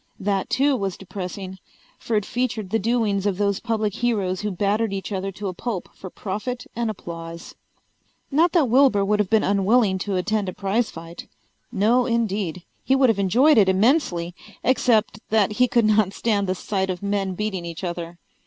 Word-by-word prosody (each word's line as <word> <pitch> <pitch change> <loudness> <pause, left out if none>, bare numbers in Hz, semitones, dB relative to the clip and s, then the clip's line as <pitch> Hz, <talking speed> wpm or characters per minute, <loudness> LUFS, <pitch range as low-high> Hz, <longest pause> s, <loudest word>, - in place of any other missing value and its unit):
That 195 -1 -1
too 275 +1 +2
was 195 -6 -3
depressing, 190 0 -7 0.4
for 230 - -2
it 210 -1 +1
featured 225 -6 -2
the 225 - +2
doings 215 -3 0
of 195 -3 -1
those 200 0 0
public 220 -3 -1
heroes 205 -6 -1
who 210 - -2
battered 205 +3 0
each 195 +2 -5
other 195 0 -2
to 200 +2 -5
a 185 - -3
pulp 200 0 -4
for 185 - -9
profit 215 +7 -5
and 235 -1 -1
applause. 170 -4 -8 0.8
Not 325 +5 +3
that 325 -7 +4
Wilbur 245 -5 +4
would 210 +1 +1
have 205 -3 +1
been 220 -1 +3
unwilling 200 0 +2
to 195 +1 -2
attend 200 +2 0
a - - -6
prize 210 +4 0
fight. 165 +1 -10 0.4
No 235 +3 +2
indeed. 205 -7 -1 0.2
He 265 - +2
would 265 -2 +4
have 215 -3 +1
enjoyed 245 - +4
it 195 -2 +5
immensely, 190 - +2 0.3
except 225 -5 +2
that 215 -2 +3
he 250 +4 +3
could 235 -2 +2
not 215 -2 +3
stand 205 -4 0
the 185 - 0
sight 190 0 -2
of 185 +1 -4
men 200 -2 -1
beating 200 -3 -3
each 170 +1 -7
other. 170 -1 -5
205 Hz, 185 wpm, -23 LUFS, 190-230 Hz, 0.8 s, it